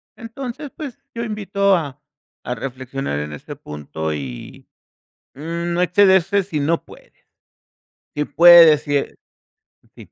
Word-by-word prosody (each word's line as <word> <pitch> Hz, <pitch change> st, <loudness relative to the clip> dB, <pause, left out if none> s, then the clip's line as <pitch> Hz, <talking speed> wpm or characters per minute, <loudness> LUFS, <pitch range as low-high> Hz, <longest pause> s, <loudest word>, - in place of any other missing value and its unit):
Entonces, 245 Hz, +4 st, -8 dB
pues, 290 Hz, -8 st, -8 dB, 0.2 s
yo 235 Hz, -, -3 dB
invito 200 Hz, -3 st, 0 dB
a 145 Hz, -5 st, -5 dB, 0.4 s
a 125 Hz, -, -3 dB
reflexionar 130 Hz, -, -5 dB
en 75 Hz, 0 st, -6 dB
este 75 Hz, -, -9 dB
punto 75 Hz, +1 st, -6 dB
y, 65 Hz, -5 st, -8 dB, 0.7 s
no 170 Hz, +4 st, -3 dB
excederse 190 Hz, +2 st, +3 dB
si 175 Hz, -5 st, -4 dB
no 160 Hz, +4 st, 0 dB
puede. -, -, -17 dB, 1.0 s
Si 150 Hz, 0 st, -1 dB
puede 175 Hz, +1 st, +8 dB
decir, 145 Hz, -2 st, +1 dB, 0.8 s
sí. -, -, -15 dB
170 Hz, 120 wpm, -20 LUFS, 130-200 Hz, 1.0 s, puede